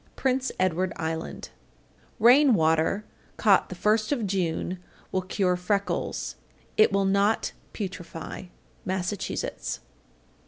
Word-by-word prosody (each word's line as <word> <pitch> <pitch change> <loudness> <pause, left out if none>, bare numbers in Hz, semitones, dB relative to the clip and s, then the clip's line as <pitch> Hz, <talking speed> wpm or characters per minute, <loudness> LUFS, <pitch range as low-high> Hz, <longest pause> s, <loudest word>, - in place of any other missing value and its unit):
Prince 265 0 0
Edward 185 0 +1
Island. 160 0 -4 0.7
840. - - -19
Rain 265 +2 +8
water 160 +5 +2 0.3
caught 200 -4 +4
the 185 - -6
first 215 +5 +2
of 245 -7 0
June 180 -1 -1 0.3
will 185 - +1
cure 185 0 +1
freckles. 200 +3 -2 0.4
It 215 - +5
will 195 0 +2
not 200 +3 +2 0.2
putrefy. 180 -3 -6 0.3
_Massachusetts. 190 +1 -3
195 Hz, 110 wpm, -27 LUFS, 180-215 Hz, 0.7 s, Rain